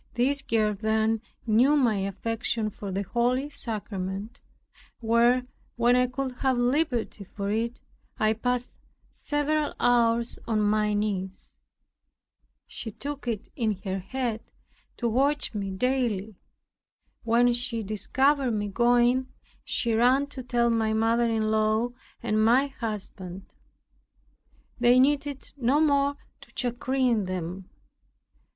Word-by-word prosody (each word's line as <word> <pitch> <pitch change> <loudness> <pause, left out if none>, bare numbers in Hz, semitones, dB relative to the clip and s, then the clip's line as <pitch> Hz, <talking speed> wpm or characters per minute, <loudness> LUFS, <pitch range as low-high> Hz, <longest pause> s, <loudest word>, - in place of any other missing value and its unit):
This 275 +3 +1
girl 215 -2 +1
then 220 +1 0 0.2
knew 245 +6 +4
my 240 -7 +3
affection 215 +3 -2
for 200 0 -7
the 195 +2 -1
holy 250 +7 0
sacrament, 205 -4 -5 0.6
where, 235 +2 +3 0.3
when 240 +1 +3
I 250 0 +3
could 260 +1 -3
have 265 -2 +1
liberty 245 -4 0
for 200 +1 -4
it, 230 +3 -1 0.4
I 215 0 +2
passed 245 +2 -2 0.4
several 295 0 -1
hours 235 -1 +2
on 220 -2 +1
my 210 0 +2
knees. 195 -2 -3 1.1
She 230 - -5
took 280 +3 -7
it 220 -4 -3
in 215 -6 -1
her 190 -2 -2
head 230 +3 -3 0.6
to 240 - -1
watch 275 +5 +1
me 200 -2 -3
daily. 220 -1 -1 0.9
When 240 +1 +3
she 235 -2 -1
discovered 265 +5 +1
me 205 -1 -2
going, 245 +3 +3 0.4
she 235 -2 0
ran 250 +5 +4
to 260 - -6
tell 240 -1 +1
my 220 -1 +1
mother 230 +2 +2
in 220 -1 0
law 220 +2 +2 0.3
and 215 -2 +1
my 245 +5 +5
husband. 205 -7 -6 1.3
There 245 +1 +5
needed 280 0 0
no 270 +3 +2
more 285 -2 +2 0.2
to - - -14
chagrin 245 -2 0
them. 185 0 -5
235 Hz, 120 wpm, -27 LUFS, 215-255 Hz, 1.3 s, my